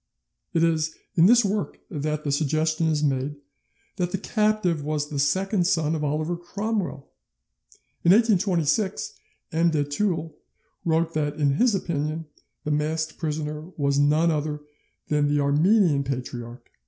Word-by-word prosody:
It 165 - +3
is 160 -1 +1 0.2
in 170 +2 +5
this 240 0 +6
work 200 +1 -2
that 150 -1 -2
the 145 - -1
suggestion 155 +3 +1
is 155 -1 +1
made 140 0 0 0.6
that 180 -2 0
the 195 - -1
captive 210 -6 0
was 150 0 -2
the 145 - -2
second 185 +6 +1
son 160 -4 +1
of 155 -2 -2
Oliver 155 +4 -1
Cromwell. 185 -4 -4 0.9
In 170 - +5
1826, 195 -3 +2 0.4
M. 165 +1 +3
de 155 -3 +1
Taules 160 +2 -1 0.5
wrote 165 0 +1
that, 150 -1 -1
in 145 -2 +2
his 240 -1 +3
opinion, 160 -3 -2 0.4
the 150 - -2
masked 155 +1 -1
prisoner 150 -1 -3 0.2
was 140 -1 +1
none 155 +3 +3
other 150 -1 -2 0.5
than 150 -1 +2
the 145 0 +1
Armenian 150 +2 +3
Patriarch. 125 -2 -6
155 Hz, 140 wpm, -25 LUFS, 145-175 Hz, 0.9 s, this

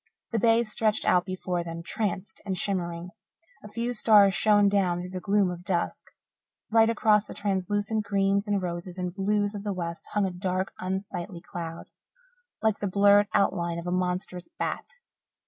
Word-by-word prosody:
The 230 - +1
bay 230 +1 +4
stretched 215 -1 0
out 180 -1 +3
before 185 -1 -2
them, 165 0 -6
tranced 195 -1 -3
and 190 -2 -3
shimmering; 175 -3 -2 0.5
a - - -8
few 235 +3 -3
stars 210 -4 +5
shone 205 0 +4
down 190 -3 +2
through 180 +1 -6
the 185 - -4
gloom 200 0 +2
of 175 0 -8
dusk. 180 -3 -2 0.7
Right 225 0 +5
across 215 -2 +3
the - - -9
translucent 205 +2 -1
greens 200 0 +1
and 200 -2 0
roses 175 +1 -5
and 180 -1 -3
blues 205 +1 0
of 205 - -5
the 205 -1 -2
west 170 -2 -5
hung 210 -1 +2
a 190 - -2
dark, 185 +1 -2
unsightly 185 -1 -4
cloud, 165 -1 -7 0.7
like 220 -2 +2
the 205 - -1
blurred 200 +1 +5
outline 170 -3 +1
of 170 - -6
a 175 - -2
monstrous 180 0 -2
bat. - - -3
195 Hz, 170 wpm, -27 LUFS, 180-205 Hz, 0.7 s, stars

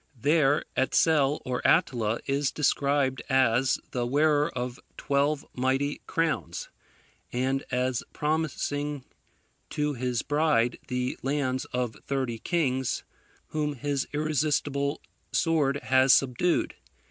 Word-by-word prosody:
There 150 +1 +3
Etsel 145 +1 +2
or 125 -1 -2
Attila, 115 -3 +2
is 140 0 +1
described 140 -3 +1
as 130 -1 +3
the 125 - -1
wearer 145 +3 +2
of 125 0 -5 0.2
twelve 140 +1 0
mighty 135 +3 0
crowns, 160 - -1 0.6
and 130 +2 0
as 125 -1 0
promising 150 -2 -2 0.6
to 150 0 -1
his 125 -2 -2
bride 145 -5 +1
the 125 0 -2
lands 135 -1 -1
of 125 -2 -3
thirty 130 -4 -2
kings, 130 -5 0 0.5
whom 150 -1 -2
his 140 +1 -2
irresistible 145 -1 0 0.3
sword 155 -5 +2
has 130 0 +5
subdued. 135 +7 +1
140 Hz, 105 wpm, -27 LUFS, 125-150 Hz, 0.6 s, has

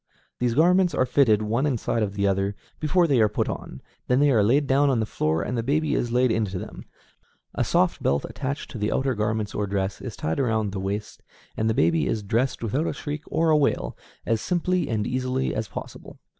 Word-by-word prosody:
These 120 -1 0
garments 180 +2 +4
are 130 - +2
fitted, 120 -5 +3
one 115 +7 0
inside 120 -3 -1
of 100 -2 -2
the 100 0 0
other, 100 +1 0 0.2
before 170 +3 +3
they 135 -7 +3
are 105 - +4
put - - -1
on; 65 - -6 0.2
then 125 +1 +3
they 145 0 +4
are 115 -5 +4
laid 130 +8 +3
down 140 +2 +3
on 130 -4 +2
the 110 - 0
floor 80 -5 -1
and 125 - -3
the 115 - 0
baby 150 +6 0
is 120 - -1
laid 125 0 +3
into 105 -4 -1
them; - - -8 0.7
a - - 0
soft - - +1
belt, 70 +1 +1
attached 140 +1 -5
to 115 - -7
the 105 +1 0
outer 135 0 +1
garment 105 -1 -1
or 105 - -1
dress, 95 0 -2
is - - -6
tied 80 - -2
around 110 -5 0
the 95 - -4
waist, 100 +2 -4 0.3
and 110 +1 0
the 110 - +1
baby 80 -3 +2
is 110 +7 -1
dressed 115 +6 -1
without 130 +9 0
a - - -1
shriek 150 0 -5
or 165 0 +1
a - - +5
wail, 145 -2 0 0.3
as 115 -1 0
simply 180 +1 0
and 110 -3 -1
easily 130 +1 -1
as 110 0 -2
possible. - - -9
115 Hz, 225 wpm, -25 LUFS, 105-140 Hz, 0.7 s, a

